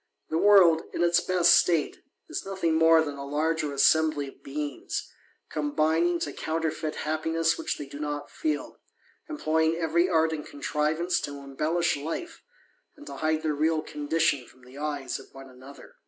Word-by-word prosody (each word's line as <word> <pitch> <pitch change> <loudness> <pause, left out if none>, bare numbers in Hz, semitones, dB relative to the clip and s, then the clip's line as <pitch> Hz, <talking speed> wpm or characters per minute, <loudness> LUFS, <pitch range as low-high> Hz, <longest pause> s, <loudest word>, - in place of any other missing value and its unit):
The 160 - +1
world, 180 -6 +6
in 175 - 0
its 175 0 +4
best 180 -1 +4
state, 165 -4 +2 0.2
is - - -4
nothing 190 -4 -1
more 160 0 +5
than 145 -2 -5
a 140 - -6
large 155 +3 0
assembly 145 0 +2
of - - -18
beings, 145 -1 -5 0.4
combining 160 +3 +1
to 145 - -3
counterfeit 160 -1 -3
happines 160 +1 0
which - - -3
they 145 - -6
do 140 +1 -10
not 145 -1 -4
feel, 310 -1 -3 0.5
employing 160 - +1
every 170 +2 +1
art 160 -2 +2
and 150 -1 -4
contrivanc 155 +4 -1
to 145 0 -8
embellish 155 +5 0
life, 165 - -6 0.6
and 295 - -13
to - - -8
hide 155 0 0
their 155 -1 0
real 155 +1 +1
condition 150 -4 0
from 130 0 -21
tli 130 +3 -12
eyes 145 -4 -3
of - - -15
one 135 0 -10
another. 130 +2 -14
155 Hz, 165 wpm, -27 LUFS, 145-165 Hz, 0.6 s, world